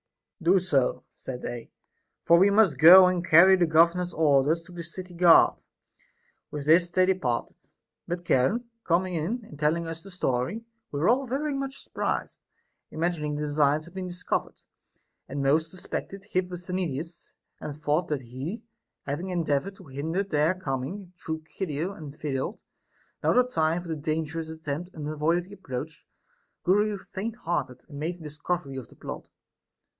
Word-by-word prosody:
Do 180 +3 +4
so, 140 -8 +1
said 125 -2 -7
they, 120 -1 -6 0.6
for 170 0 +6
we 195 +2 +6
must 200 - +4
go 185 +4 +10
and 180 -1 +1
carry 175 +3 +7
the 175 -2 +2
governor's 170 +3 +3
orders 155 +1 +3
to 180 - -15
the 175 -1 -7
city 180 +2 -8
guard. 170 -1 +6 0.9
With 145 -2 -5
this 170 +3 +5
they 185 +1 +3
departed, 150 -11 -1 0.5
but 175 0 -4
Charon 170 - +2 0.2
coming 180 +2 +1
in 200 +9 -2
and 150 -7 -13
telling 160 +3 +1
us 165 0 -6
the 195 - -11
story, 180 - -1 0.3
we 145 - -3
were 160 - +2
all 260 +3 +2
very 285 +4 -1
much 275 0 -5
surprised, - - -3 0.5
imagining 160 -2 -2
the 150 - -3
design 150 0 +2
had 170 +2 -13
been 190 -1 -4
discovered; 180 0 -3 0.7
and 140 +1 -3
most 155 +4 +2
suspected 190 +2 -6
Hipposthenides, 180 -3 -3 0.3
and 145 - -6
thought 155 +3 0
that 150 -3 -2
he, 130 - -6 0.4
having 150 +7 -3
endeavored 175 +1 -1
to 190 - -15
hinder 155 +7 -2
their 160 -2 +1
coming 175 +4 -5
through 160 0 -4
Chido 170 +2 -4
and 150 -4 -10
failed, 145 - -2 0.6
now - - +3
the 250 - +5
time 165 -5 0
for 170 - -10
the 160 - -1
dangerous 155 +1 -3
attempt 160 +2 -5
unavoidably 160 +5 -1
approached, 150 -5 -7 0.6
grew 205 +3 +2
faint 210 +3 -6
hearted 150 - -3
and 145 -3 -9
made 165 +4 -2
a 175 - -14
discovery 150 -1 -3
of 125 -4 -7
the - - -19
plot. - - -8
165 Hz, 160 wpm, -27 LUFS, 150-185 Hz, 0.9 s, go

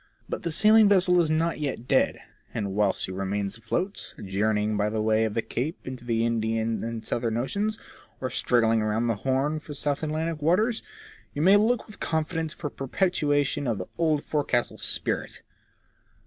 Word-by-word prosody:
But - - -4
the 170 - -2
sailing 215 +5 +6
vessel 180 -3 +5
is 160 - 0
not 160 +1 +1
yet 135 -5 -3
dead; - - +2 0.4
and 100 -3 -2
whilst 100 -1 +1
she - - -3
remains 100 +2 -2
afloat, 175 - -3
journeying 105 +2 0
by 105 0 +1
way 110 0 +2
of 110 - -3
the 115 - 0
Cape 150 +8 -3
into 130 -2 -7
the 115 -1 0
Indian 115 -1 0
and 115 -1 -5
Southern 115 -1 -1
Oceans, 205 - -1 0.4
or 130 - -3
struggling 115 -2 +2
round 110 +2 0
the 115 -2 0
Horn 135 +6 0
for 150 -1 -9
South 145 0 -1
Atlantic 155 0 -2
waters, 215 +9 +2 0.5
you 145 - 0
may 190 +3 +7
look 220 +3 +2
with 215 - -13
confidence 160 0 -1
for 150 -3 -5
perpetuation 145 -2 0
of 115 -3 0
the 90 - -4
old 155 -3 +2
forecastle 140 -5 -1
spirit. - - -2
135 Hz, 170 wpm, -26 LUFS, 110-165 Hz, 0.5 s, may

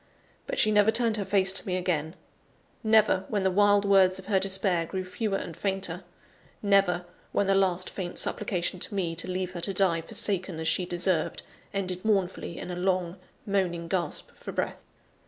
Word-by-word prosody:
But - - -3
she 215 - +3
never 210 0 +5
turned 225 -1 +2
her 200 - -2
face 190 0 +2
to 200 - +1
me 185 -1 0
again; 165 -3 -1 0.7
never, 220 -3 +4
when 205 -3 -1
the 190 - +2
wild 205 +1 +4
words 190 -2 +5
of 190 - -9
her 200 -3 +2
despair 190 -2 +2
grew 185 +1 -4
fewer 195 +2 -2
and 170 - -6
fainter; 190 -2 -2 0.6
never, 195 -3 +3 0.3
when 200 - +2
the 195 - +3
last 185 -2 +2
faint 180 -3 -5
supplication 185 -3 -1
to 200 - -3
me, 175 -4 -1
to 165 +3 -2
leave 185 0 -2
her 175 -2 -6
to 195 +2 -2
die 175 -4 +3
forsaken 185 -1 -2
as 160 - -2
she 180 +1 +2
deserved, 175 -1 -1 0.3
ended 185 -2 -3
mournfully 195 -5 0
in 180 - -6
a - - -4
long, 180 -1 -1 0.3
moaning 180 -4 -1
gasp 170 -3 -1
for - - -8
breath. - - -3
190 Hz, 185 wpm, -27 LUFS, 180-200 Hz, 0.7 s, never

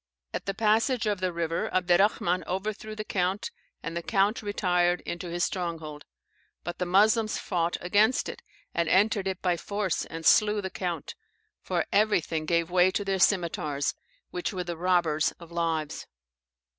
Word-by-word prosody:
At - - -4
the 195 - -1
passage 225 +3 +2
of 205 -2 0
the 185 -1 0
river, 170 -1 -2
Abderrahman 180 0 +2
overthrew 215 +3 -4
the 215 - -4
count, 195 +2 -1 0.3
and 165 +2 -5
the 170 - -2
count 205 +4 +1
retired 180 -4 +1
into 175 +1 -5
his 175 +1 -1
stronghold, 165 -5 -3 0.6
but 175 - -6
the 180 - -1
Moslems 215 +4 +3
fought 175 -2 -1
against 210 +7 +3
it, - - -7 0.3
and 170 -2 0
entered 200 +1 +3
it 190 -1 -4
by 180 -2 +2
force, 200 -1 -2
and 165 0 -7
slew 210 +6 +5
the 190 -2 -4
count; 175 - -4 0.5
for - - -1
everything 170 -7 +1
gave 170 0 +1
way 180 0 +5
to 205 +2 -2
their 195 -1 0
scimetars, 160 -7 +1 0.4
which 180 - -3
were 185 -3 -3
the 175 -1 -4
robbers 170 -3 +1
of 170 -1 -14
lives. 165 -3 -2
180 Hz, 160 wpm, -27 LUFS, 170-205 Hz, 0.6 s, slew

